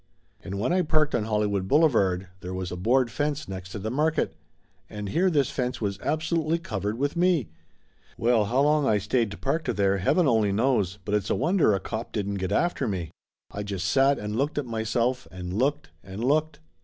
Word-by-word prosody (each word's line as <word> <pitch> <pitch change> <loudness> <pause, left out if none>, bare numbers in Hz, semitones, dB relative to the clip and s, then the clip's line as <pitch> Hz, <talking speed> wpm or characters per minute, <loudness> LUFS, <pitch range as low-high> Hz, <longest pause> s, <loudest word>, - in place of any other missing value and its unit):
And 100 +2 -5
when 125 +11 +1
I 185 - +3
parked 155 -2 +1
on 110 -3 0
Hollywood 105 -3 0
Boulevard 100 - +3
there 90 0 -6
was 95 -1 -4
a - - -3
board 120 +6 +2
fence 145 +3 -2
next 95 -1 -7
to - - -4
the 110 +2 -4
market, 155 +4 0 0.5
and 105 -1 -5
here 180 - +2
this 145 -6 +1
fence 125 -1 -2
was 100 -2 -2
absolutely 155 - 0
covered 105 - -3
with 145 +4 -1
me! 170 - +2 0.7
Well, 115 -2 +3
how 125 +6 +1
long 150 0 +3
I 105 - +3
stayed 105 +1 -1
parked 145 -2 -1
there, 100 -1 +2
heaven 160 - +3
only 110 -5 +3
knows, 105 -3 +1
but 105 - -3
it's 105 -2 0
a - - +2
wonder 160 - +3
a - - -1
cop 110 +4 -5
didn't 100 -2 -2
get 95 +1 -2
after 175 +8 +1
me. 90 -6 -3 0.4
I 105 - -5
just 100 -3 -3
sat 135 +8 +4
and 105 0 -4
looked 140 +6 -1
at 145 - -1
myself 115 +2 -1
and 90 -1 -6
looked 130 - 0
and 95 +4 -7
looked. 155 +4 +1
115 Hz, 200 wpm, -26 LUFS, 100-145 Hz, 0.7 s, sat